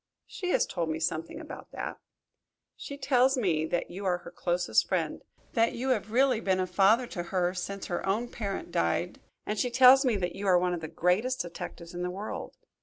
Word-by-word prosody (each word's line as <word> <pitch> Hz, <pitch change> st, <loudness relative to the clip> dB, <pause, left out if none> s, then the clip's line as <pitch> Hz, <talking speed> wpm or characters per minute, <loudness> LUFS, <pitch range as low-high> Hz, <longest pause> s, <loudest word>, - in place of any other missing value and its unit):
"She 360 Hz, -, -5 dB
has -, -, +3 dB
told 170 Hz, -3 st, -3 dB
me 160 Hz, 0 st, -2 dB
something 165 Hz, -, -2 dB
about 320 Hz, -, -9 dB
that." -, -, -5 dB, 0.8 s
"She 280 Hz, -, -8 dB
tells 265 Hz, -1 st, +3 dB
me 160 Hz, -9 st, +1 dB, 0.2 s
you 190 Hz, +3 st, -8 dB
are 180 Hz, -2 st, +1 dB
her 175 Hz, -1 st, -11 dB
closest 175 Hz, 0 st, +1 dB
friend -, -, -1 dB, 0.3 s
that 230 Hz, -1 st, +3 dB
you 255 Hz, +3 st, -3 dB
have 215 Hz, -4 st, 0 dB
really 255 Hz, -1 st, +3 dB
been 190 Hz, -4 st, +1 dB
a 185 Hz, -, +1 dB
father 195 Hz, +7 st, +4 dB
to 190 Hz, -6 st, -5 dB
her 180 Hz, 0 st, 0 dB
since 195 Hz, +2 st, -5 dB
her 175 Hz, -, -3 dB
own 215 Hz, +5 st, 0 dB
parent 200 Hz, -5 st, -5 dB
died. 85 Hz, 0 st, 0 dB, 0.2 s
And 210 Hz, 0 st, -2 dB
she 250 Hz, -, +1 dB
tells 260 Hz, +2 st, +7 dB
me 250 Hz, -5 st, +2 dB
that 180 Hz, -3 st, -2 dB
you 200 Hz, +1 st, -4 dB
are 185 Hz, -2 st, +6 dB
one 180 Hz, 0 st, +1 dB
of 170 Hz, -, -3 dB
the 160 Hz, -, -4 dB
greatest 200 Hz, +12 st, +1 dB
detectives 170 Hz, 0 st, -7 dB
in 175 Hz, -, -5 dB
the 180 Hz, -, -1 dB
world. 195 Hz, +4 st, -6 dB
195 Hz, 205 wpm, -29 LUFS, 175-245 Hz, 0.8 s, tells